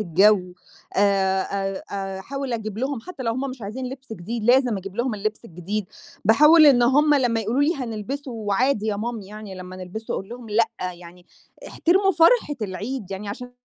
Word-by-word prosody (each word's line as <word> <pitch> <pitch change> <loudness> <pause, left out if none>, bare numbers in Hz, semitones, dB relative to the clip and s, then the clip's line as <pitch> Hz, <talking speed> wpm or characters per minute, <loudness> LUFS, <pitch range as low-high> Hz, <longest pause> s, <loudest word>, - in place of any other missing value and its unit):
الجَو، 195 +3 +4 0.6
آآ، 195 -1 +3 0.5
آآ 195 -1 -4
أحاول 275 +5 -5
أجييب 215 -2 -4
لهُم 265 0 -2
حتّى 275 +2 -8
لو 230 -2 0
هم 260 +3 -3
مش 255 -2 -10
عايزين 235 +6 -5
لبْس 265 -2 -9
جديد 220 +4 -5
لازم 245 -1 +4
أجيب 190 +1 -9
لهُم 240 -1 0
اللبس 215 +2 -3
الجديد، 195 +2 -4 0.4
باحاول 300 - +7
إن 255 -4 +6
هم 295 +5 +4
لمّا 245 -5 +2
يقولوا 230 +6 0
لي: 315 +4 +2
"هنلبسه 255 +2 -5
وعادي 220 +1 0
يا 210 -2 0
مامي 220 -1 -4
يعني 210 -1 -9
لمّا 185 0 -9
نلبسه." 185 +5 -6
أقول 195 - -5
لهم: 240 -1 -9
"لأ، 220 +2 +3 0.3
يعني 175 0 -14 0.4
احترموا 385 +3 +2
فرحة 335 -1 +4
العيد." 210 +2 -5
يعني 195 +1 -5
عشان 245 +5 -7
225 Hz, 175 wpm, -23 LUFS, 200-260 Hz, 0.6 s, باحاول